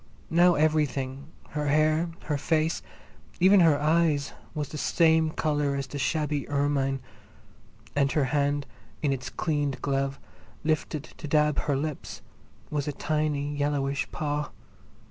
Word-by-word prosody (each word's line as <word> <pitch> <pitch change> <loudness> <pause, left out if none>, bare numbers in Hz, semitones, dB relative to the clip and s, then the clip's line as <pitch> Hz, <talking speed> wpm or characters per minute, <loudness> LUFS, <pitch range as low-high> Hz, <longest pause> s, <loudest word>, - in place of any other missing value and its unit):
Now 175 +1 +5
everything, 145 -3 0 0.2
her 150 0 -2
hair, 155 +3 +3
her 150 - -1
face, 160 +2 +1 0.6
even 190 +3 +6
her 160 -5 +5
eyes, 155 -2 +2 0.2
was 150 -2 -3
the 155 - -6
same 160 0 +3
colour 150 -2 0
as 140 0 -2
the 145 +2 -6
shabby 150 0 -1
ermine, 140 -2 0 0.9
and 140 -1 +2
her 150 - +2
hand, 145 0 +1 0.4
in 140 -2 +2
its 130 -1 -5
cleaned 145 -4 -1
glove, 135 -1 -1 0.4
lifted 155 -1 -1
to 155 - -10
dab 150 0 +3
her 145 - 0
lips, 150 0 -5 0.5
was 145 -1 -1
a - - 0
tiny 145 -1 -1
yellowish 145 -1 -1
paw. 150 -1 -2
150 Hz, 135 wpm, -27 LUFS, 140-155 Hz, 0.9 s, even